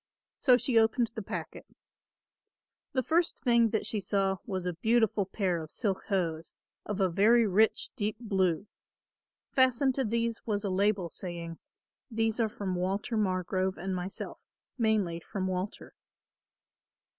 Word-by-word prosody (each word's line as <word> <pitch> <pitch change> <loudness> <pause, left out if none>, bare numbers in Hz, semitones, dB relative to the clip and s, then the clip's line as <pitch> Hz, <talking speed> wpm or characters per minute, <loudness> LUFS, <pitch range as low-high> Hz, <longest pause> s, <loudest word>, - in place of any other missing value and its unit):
So 255 -3 +5
she 245 -2 +3
opened 225 +1 +2
the 220 - -4
packet. 195 - -6 1.2
The 260 - 0
first 335 +6 +1
thing 235 -3 +4
that 220 - -1
she 215 - -1
saw 195 -1 0
was 190 -4 -3
a 180 - -1
beautiful 220 +1 +2
pair 185 -4 -1
of 155 - -8
silk 195 -1 -2
hose 165 -5 -1 0.3
of 210 -1 -3
a 190 - +4
very 215 +6 +4
rich 215 +2 +2
deep 210 +1 -2
blue. 190 -5 0 0.9
Fastened 260 0 +3
to 270 - 0
these 230 0 -1
was 205 -2 -1
a 200 - -1
label, 195 -2 +1
saying: 170 -2 -5 0.5
"These 225 -1 0
are 225 -2 +2
from 200 -3 -4
Walter 195 +6 -1
Margrove 185 -2 0
and 190 +1 -3
myself, 185 +2 -5 0.4
mainly 215 -8 +1
from 190 +3 -4
Walter." 185 +1 -4
205 Hz, 145 wpm, -30 LUFS, 185-225 Hz, 1.2 s, So